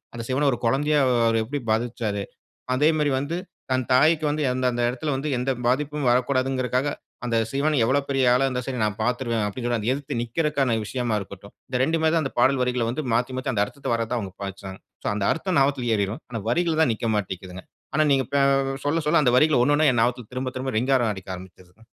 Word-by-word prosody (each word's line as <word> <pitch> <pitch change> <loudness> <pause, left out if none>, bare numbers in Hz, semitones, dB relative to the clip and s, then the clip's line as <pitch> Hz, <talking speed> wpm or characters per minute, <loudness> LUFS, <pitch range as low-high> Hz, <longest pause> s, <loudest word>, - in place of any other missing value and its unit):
அந்த 115 -1 -5
சிவன 140 +3 +1
ஒரு 120 - -3
கொழந்தையா 145 +5 +2 0.3
அவரு 115 -1 +2
எப்படி 140 +3 -4
பாவிச்சசாரு. 110 -3 -1 0.5
அதே 150 +4 +4
மாரி 145 -2 +2
வந்து 155 +5 -3 0.3
தன் 130 0 +2
தாய்க்கு 155 +4 +4
வந்து, 150 0 -1
அந்த 130 0 -2
அந்த 120 0 -2
எடத்துல 130 +5 -3
வந்து 135 +3 -3
எந்த 125 +2 -2 0.2
பாதிப்பும் 145 +2 0
வரக்கூடாதுங்கிறதற்காக, 130 +1 +1 0.4
அந்த 120 -1 -1 0.2
சிவன 145 +2 +1
எவ்வளவு 140 +3 +1
பெரிய 135 -1 +1
ஆளா 130 +2 +3
இருந்தாலும் 125 -1 -2
சரி 125 -4 -3
நான் 105 -1 -1
பாத்துருவேன் 120 -2 0
அப்டிங்கிறத 120 0 -2
எதிர்த்து 135 -4 -4
நிக்கிறதுக்கான 135 0 0
விஷயமா 120 -2 -2
இருக்கட்டும். 100 +1 -10 0.2
இந்த 125 -1 -1
2மே 160 +2 +2
தான் 165 -2 +2
அந்த 135 - -4
பாடல் 130 +1 +3
வரிகளை 125 -2 0
வந்து 135 +6 -3
மாத்தி 125 +2 0
மாத்தி 130 +1 -2
அந்த 100 -3 +2
அர்த்தத்த 140 +7 -7
வர்றத 115 -1 -1
தான் 125 - 0
அவங்க 95 -3 -6
பாவிச்சாங்க 95 -1 -7 0.3
சோ - - +1
அந்த 100 -1 -1
அர்த்தம் 175 +1 -1
ஞாபகத்துல 135 -3 +1
ஏறிரும். 100 +3 -2
ஆனா 115 - -4
வரிகள் 165 +2 +1
தான் 130 - +4
நிக்க 115 +1 -3
மாட்டேக்கிதுங்க. 95 -2 -5 0.3
ஆனா 155 0 +3
நீங்க 135 -1 +3
பே 140 - +3 0.5
சொல்ல 160 +3 +1
சொல்ல 155 -1 +4
அந்த 125 -1 +3
வரிகள 150 -3 +4
ஒன்னொன்னா 145 +2 +3
என் 120 - +1
ஞாபகத்ல 120 -2 -2
திரும்ப 130 0 -3
திரும்ப 130 -1 -3
ரிங்காரம் 125 -3 +2
அடிக்க 95 -1 -7
ஆரம்பிச்சிருச்சுங்க. 95 +3 -15
125 Hz, 200 wpm, -24 LUFS, 115-140 Hz, 0.5 s, அதே